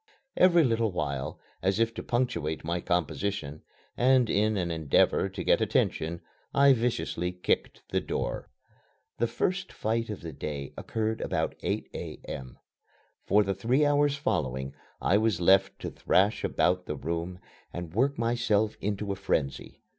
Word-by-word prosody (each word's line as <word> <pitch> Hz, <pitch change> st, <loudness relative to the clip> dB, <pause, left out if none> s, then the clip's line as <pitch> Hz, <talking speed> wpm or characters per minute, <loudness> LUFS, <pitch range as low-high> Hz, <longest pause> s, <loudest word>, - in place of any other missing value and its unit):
Every 175 Hz, -2 st, +6 dB
little 115 Hz, -4 st, +1 dB
while, 70 Hz, -6 st, -3 dB, 0.2 s
as 95 Hz, +2 st, +1 dB
if 115 Hz, 0 st, +2 dB
to -, -, -5 dB
punctuate 120 Hz, -11 st, -1 dB
my 85 Hz, +2 st, -1 dB
composition, 85 Hz, -2 st, -2 dB, 0.3 s
and 130 Hz, -1 st, +4 dB
in 105 Hz, +1 st, +2 dB
an 85 Hz, -2 st, -1 dB
endeavor 80 Hz, +4 st, +2 dB
to 95 Hz, -1 st, -5 dB
get -, -, +3 dB
attention, 80 Hz, +2 st, 0 dB, 0.3 s
I 140 Hz, 0 st, +7 dB
viciously 115 Hz, -7 st, -1 dB
kicked 90 Hz, 0 st, -1 dB
the -, -, 0 dB
door. -, -, -3 dB, 0.7 s
This 120 Hz, -, +1 dB
first 180 Hz, +10 st, -1 dB
fight 115 Hz, +1 st, -1 dB
of 105 Hz, -, -5 dB
the 80 Hz, -, -6 dB
day 70 Hz, 0 st, -5 dB
occurred 110 Hz, 0 st, -2 dB
about -, -, -1 dB
8 -, -, -2 dB
A.M. 65 Hz, -2 st, -7 dB, 0.7 s
For 105 Hz, +1 st, +5 dB
the 95 Hz, -1 st, -1 dB
three 120 Hz, +10 st, +2 dB
hours 145 Hz, 0 st, +3 dB
following 65 Hz, -, -1 dB, 0.3 s
I 100 Hz, -, +3 dB
was 110 Hz, -5 st, +1 dB
left 95 Hz, +2 st, +4 dB
to -, -, -4 dB
thrash 100 Hz, +3 st, +2 dB
about 90 Hz, +1 st, +1 dB
the 75 Hz, -, -2 dB
room 85 Hz, +5 st, -3 dB, 0.3 s
and 85 Hz, -2 st, -6 dB
work 135 Hz, +7 st, +2 dB
myself 115 Hz, -2 st, +1 dB
into 100 Hz, 0 st, -2 dB
a -, -, -1 dB
frenzy. 70 Hz, -8 st, -2 dB
100 Hz, 150 wpm, -28 LUFS, 85-115 Hz, 0.7 s, I